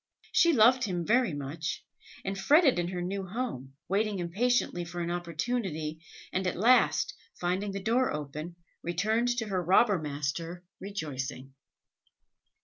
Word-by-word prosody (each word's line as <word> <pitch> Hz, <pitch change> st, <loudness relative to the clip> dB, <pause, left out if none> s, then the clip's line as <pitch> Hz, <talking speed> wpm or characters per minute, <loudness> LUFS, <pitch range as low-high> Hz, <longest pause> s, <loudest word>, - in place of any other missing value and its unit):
She 340 Hz, -, +5 dB
loved 245 Hz, +1 st, +5 dB
him 175 Hz, -4 st, -2 dB
very 235 Hz, -, +3 dB
much, 145 Hz, +4 st, -4 dB, 0.4 s
and 195 Hz, 0 st, -2 dB
fretted 275 Hz, -, +4 dB
in 175 Hz, -, 0 dB
her 180 Hz, -1 st, -3 dB
new 195 Hz, +2 st, -3 dB
home, 185 Hz, -, -4 dB
waited 200 Hz, +1 st, 0 dB
impatiently 190 Hz, +1 st, +1 dB
for 175 Hz, +1 st, -6 dB
an 170 Hz, 0 st, -2 dB
opportunity, 170 Hz, -2 st, -3 dB, 0.3 s
and 185 Hz, 0 st, 0 dB
at 180 Hz, -, -1 dB
last, 240 Hz, +7 st, +4 dB, 0.3 s
finding 185 Hz, +3 st, -1 dB
the 195 Hz, 0 st, -5 dB
door 245 Hz, +4 st, +2 dB
open, 150 Hz, +3 st, -5 dB, 0.3 s
returned 215 Hz, +8 st, +1 dB
to 225 Hz, -, -1 dB
her 190 Hz, -4 st, -1 dB
robber 195 Hz, +2 st, +4 dB
master 155 Hz, +4 st, -4 dB, 0.2 s
rejoicing. 135 Hz, -9 st, -5 dB
180 Hz, 140 wpm, -29 LUFS, 165-220 Hz, 0.4 s, She